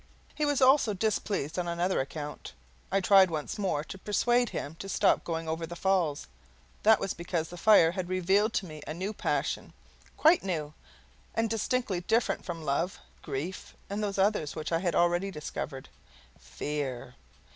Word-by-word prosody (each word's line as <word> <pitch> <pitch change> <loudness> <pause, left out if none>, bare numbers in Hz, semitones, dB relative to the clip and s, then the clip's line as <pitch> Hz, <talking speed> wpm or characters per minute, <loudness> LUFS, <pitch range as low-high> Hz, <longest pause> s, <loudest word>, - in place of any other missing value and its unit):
He 300 -1 0
was 285 -2 +2
also 260 -5 +5
displeased 195 -6 -1
on 175 - -2
another 175 +2 0
account: 145 +2 -7 0.4
I 195 +1 +2
tried 190 -1 +6
once 155 +4 -4
more 185 -7 0
to 155 +5 -9
persuade 240 +4 +2
him 145 - -5
to 195 - -6
stop - - +3
going 165 -1 -3
over 160 +1 -2
the 175 - -7
Falls. 175 -6 +1 0.6
That 220 0 +6
was 195 - -2
because 170 -1 -3
the 175 - -8
fire 175 -3 +6
had 180 -1 -4
revealed 190 +4 +2
to 200 - 0
me 155 -3 -9
a 155 - -4
new 190 +5 -3
passion - - -2 0.4
quite 320 +3 +5
new, 155 -6 -3 0.6
and 225 -1 +1
distinctly 225 -3 0
different 225 +6 +1
from 165 -3 -5
love, 150 +7 0 0.2
grief, 155 +6 -5 0.2
and 205 +1 -2
those 200 -1 -2
others 195 -7 +1
which 155 0 -4
I 165 - +2
had 175 -2 -1
already 175 +3 +2
discovered 150 -5 -6 0.5
FEAR. 125 - -4
180 Hz, 170 wpm, -29 LUFS, 155-205 Hz, 0.6 s, tried